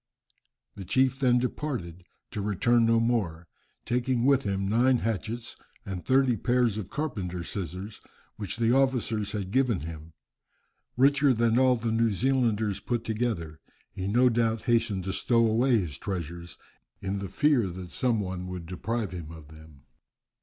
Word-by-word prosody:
The 100 - -8
chief 130 +7 +1
then 125 -3 +4
departed, 120 - -3 0.3
to 105 - -4
return 115 +4 +2
no 115 0 +4
more, 100 -8 -1 0.4
taking 125 0 0
with 135 -2 +3
him 100 -1 -1
nine 125 +5 +3
hatchets, 115 +1 -3 0.3
and 95 -2 -5
thirty 130 -2 +3
pairs 120 -2 +1
of 100 -3 -6
carpenter's 95 - -4
scissors, 95 +2 -6 0.3
which 105 0 -5
the 115 0 +2
officers 125 -6 +1
had 100 -3 -4
given 125 - +2
him. 80 0 -8 0.8
Richer 140 0 +4
than 115 +1 +2
all 130 -1 +5
the 115 -1 -2
New 115 +1 +2
Zealanders 110 -3 +1
put 120 -2 -2
together, 110 -9 -2 0.3
he 95 0 -5
no 120 +5 +4
doubt 115 -2 +1
hastened 115 -6 +1
to 95 +1 -3
stow 115 -1 +2
away 120 +3 +3
his 85 -8 -3
treasures, 85 -2 -5 0.4
in 100 0 -3
the 100 -1 -5
fear 135 -1 +2
that 90 0 -8
some 120 -4 +1
one 90 -2 -4
would 90 -2 -6
deprive 105 +4 -3
him 85 -3 -7
of 80 -3 -12
them. 80 -3 -15
110 Hz, 155 wpm, -27 LUFS, 95-120 Hz, 0.8 s, all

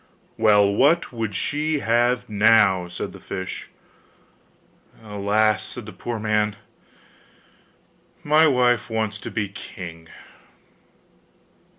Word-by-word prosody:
'Well, 105 -2 +4
what 145 +7 +2
would 110 -4 -4
she 150 +7 -1
have 120 0 +1
now?' 105 -4 +4
said 90 0 -6
the - - -11
fish. 95 -1 -6 1.3
'Alas!' 105 +1 +1
said 120 -4 -8
the 110 - -10
poor 120 -1 -5
man, 105 -1 0 1.7
'my 155 +2 +5
wife 125 -5 +2
wants 110 -2 -2
to - - -7
be 105 -2 -2
king. 85 -4 -10
110 Hz, 100 wpm, -23 LUFS, 100-120 Hz, 1.7 s, my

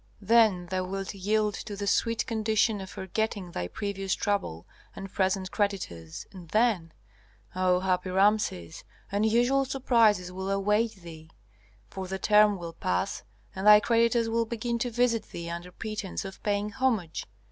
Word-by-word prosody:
Then 215 -4 +4
thou 185 +1 -2
wilt 195 +2 -4
yield 210 +2 0
to 205 0 -6
the 200 0 -4
sweet 230 +3 +1
condition 220 -1 +1
of 190 - -8
forgetting 195 -1 -3
thy 90 - -3
previous 195 - -3
trouble 140 - -2 0.3
and 195 -1 -8
present 190 -1 0
creditors, 175 - -3
and 180 -4 -12
then 215 -6 +1 0.6
Ah, 185 -1 +2
happy 185 0 0
Rameses, 190 - +1 0.3
unusual 235 +6 +2
surprises 230 -8 +2
will 190 +1 -5
await 210 +3 +1
thee! 165 -3 -12 0.6
For 190 -1 -5
the 190 +1 -3
term 210 +1 +4
will 170 -2 -7
pass, 90 - -2 0.3
and 190 +2 -2
thy 210 0 +10
creditors 230 +1 +2
will 230 0 +1
begin 235 +1 -2
to 245 - -1
visit 235 -1 +1
thee 170 0 -6
under 170 +1 -6
pretence 210 -1 -5
of 190 - -9
paying 205 0 -1
homage. 225 -10 -1
200 Hz, 150 wpm, -28 LUFS, 185-220 Hz, 0.6 s, thy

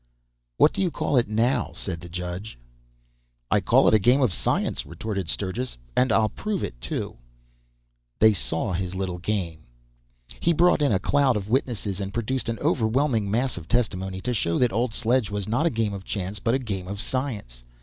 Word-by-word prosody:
"What - - +5
do - - -2
you 185 - +2
call 150 - -1
it 120 - +3
now?" 115 +3 +1
said 90 -4 -4
the 85 - -9
judge. 90 - -5 0.9
"I - - +5
call - - +4
it - - +5
a 110 - +6
game 125 +7 +4
of 115 -8 +2
science!" - - 0
retorted 100 -6 -4
Sturgis; 105 - -3 0.2
"and 125 -1 +3
I'll 110 -1 +3
prove 210 - -3
it, - - -6
too!" - - -4 1.0
They 110 0 +6
saw 90 +1 0
his 90 +1 -3
little 95 -2 -3
game. 90 -4 -2 0.8
He 170 - +2
brought 170 0 +4
in 145 - +3
a 100 - +4
cloud 135 +3 +2
of 100 0 -5
witnesses, 110 -7 0
and 100 0 -5
produced 120 +2 -1
an 115 - -2
overwhelming 120 - +1
mass 120 +3 0
of 85 -2 -8
testimony, 95 -5 -1
to 125 - -1
show 85 -7 0
that 125 -5 +2
old 115 +1 0
sledge 120 -2 +1
was 100 -2 -3
not 120 +10 +2
a - - +4
game 110 -6 -1
of 95 -1 -6
chance 100 +1 -4
but 115 +2 +1
a - - +3
game 100 -8 -4
of 100 +1 -5
science. 110 - -3
110 Hz, 195 wpm, -25 LUFS, 95-125 Hz, 1.0 s, a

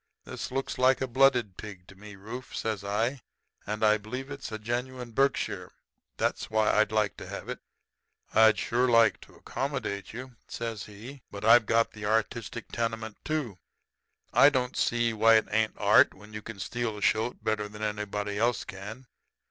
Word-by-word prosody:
This - - -6
looks 135 0 -3
like 130 +1 +4
a 130 - 0
blooded 125 -6 +3
pig 100 -4 -9
to 95 - -14
me, 105 +1 -11
Rufe,' 115 +6 -8
says 110 -3 -2
I. 115 +6 -1 0.5
'I 105 +1 +3
believe 130 +6 -6
it's 135 -4 -6
a 110 - -3
genuine 120 +2 -4
Berkshire. 135 +4 0 0.4
That's - - -1
why 110 -1 +2
I'd 110 - +3
like 110 -2 +1
to - - -8
have - - -7
it.' - - -4 0.7
"'I'd 110 -1 +6
shore 125 +4 +1
like 115 -2 +4
to - - -16
accommodate 135 -8 -4
you,' 125 +1 -9
says 115 -3 -5
he, 115 +7 -11
'but 100 +1 -6
I've 115 -1 +7
got 115 0 +3
the 105 -1 -8
artistic 110 +1 -1
tenement, 115 -2 -3
too. 140 -12 -3 0.7
I 140 - +8
don't 130 -3 -1
see 120 -1 +1
why 115 +1 +5
it 110 - +3
ain't 110 0 +1
art - - +5
when 105 +2 -15
you 105 - -5
can 115 0 -8
steal 115 +2 -3
a - - -8
shoat 110 +3 +1
better 105 -1 -1
than 105 +1 -8
anybody 105 -1 -2
else 120 +1 +1
can. 105 +6 -8
110 Hz, 175 wpm, -28 LUFS, 105-125 Hz, 0.7 s, I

